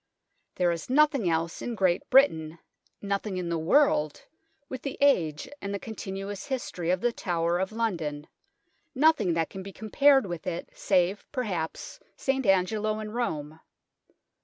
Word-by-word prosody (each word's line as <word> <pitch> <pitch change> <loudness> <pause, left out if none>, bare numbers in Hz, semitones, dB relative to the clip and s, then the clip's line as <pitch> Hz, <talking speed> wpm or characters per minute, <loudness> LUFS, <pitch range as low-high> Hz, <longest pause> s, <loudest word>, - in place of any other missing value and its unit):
There 180 -1 +2
is 170 +5 -5
nothing 280 - +3
else 165 0 -1
in 240 - -4
Great 185 -3 +1
Britain, 165 - +4 0.5
nothing 200 -1 -2
in 180 -2 -3
the 170 - 0
world, 160 - +2 0.4
with 260 - -6
the 275 - -5
age 165 - +2
and 200 - -4
the - - -3
continuous 195 -1 -6
history 240 -10 -3
of 180 +1 +1
the 240 - +2
Tower 170 -3 -1
of 190 +2 -1
London 165 -10 -2 0.7
nothing 265 - +3
that 165 -1 -1
can 195 - -7
be 195 +1 -8
compared 270 +6 +3
with 175 -3 -6
it 175 -1 -4
save, 190 0 +1
perhaps, 195 - -4 0.2
St. 265 -3 -1
Angelo 210 +3 +2
in 215 -1 -6
Rome. 160 -10 -3
195 Hz, 150 wpm, -27 LUFS, 170-235 Hz, 0.7 s, Britain